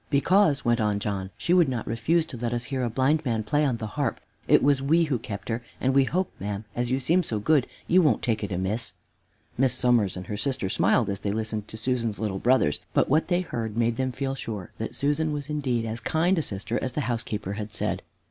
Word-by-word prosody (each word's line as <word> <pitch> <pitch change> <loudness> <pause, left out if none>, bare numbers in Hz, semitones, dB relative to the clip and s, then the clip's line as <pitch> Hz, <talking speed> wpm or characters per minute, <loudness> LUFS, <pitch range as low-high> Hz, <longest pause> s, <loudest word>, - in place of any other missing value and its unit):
"Because," 155 +1 +3
went 120 0 +3
on 105 -1 +1
John, 100 -2 -3
"she 175 - +1
would 175 -6 +5
not 120 -4 -3
refuse 155 +10 +1
to 135 - -8
let 120 0 -2
us 120 0 -2
hear 130 - 0
a 120 - 0
blind 135 +7 +2
man 115 -5 0
play 145 +8 +1
on 130 -5 +1
the 115 - -5
harp. 120 +3 -2 0.3
It - - +5
was 140 -1 +4
we 160 +5 +3
who 140 -7 0
kept 100 -3 -7
her, 115 +1 -1 0.2
and 130 +1 +1
we 135 0 +5
hope, 185 +5 -1
ma'am, 100 +1 -4
as 120 0 -1
you 130 +1 +1
seem 170 +7 +3
so 115 -10 -2
good, 130 +5 +2 0.2
you 185 +2 +5
won't 145 -10 +2
take 110 -3 0
it 100 - -3
amiss." 95 +6 -1 0.7
Miss 135 -1 +3
Somers 120 -7 +2
and 90 - -6
her 105 - -4
sister 130 -5 -1
smiled 115 +3 +2
as 100 -1 -2
they 100 - -2
listened 110 0 -3
to 110 - -9
Susan's 115 -2 0
little 100 -3 -2
brothers, 120 - +3 0.2
but - - +3
what 155 +4 +3
they 175 0 +2
heard 115 - -4
made 115 0 +1
them 130 0 0
feel 135 +2 -2
sure 105 -8 -6
that - - -4
Susan 150 +2 +1
was 145 0 -4
indeed 130 -6 0
as 115 +1 -3
kind 170 +6 +1
a - - +2
sister 110 -2 -3
as 130 - -2
the 150 - -1
housekeeper 110 -5 -3
had 105 0 -5
said. - - -2
120 Hz, 240 wpm, -26 LUFS, 110-145 Hz, 0.7 s, would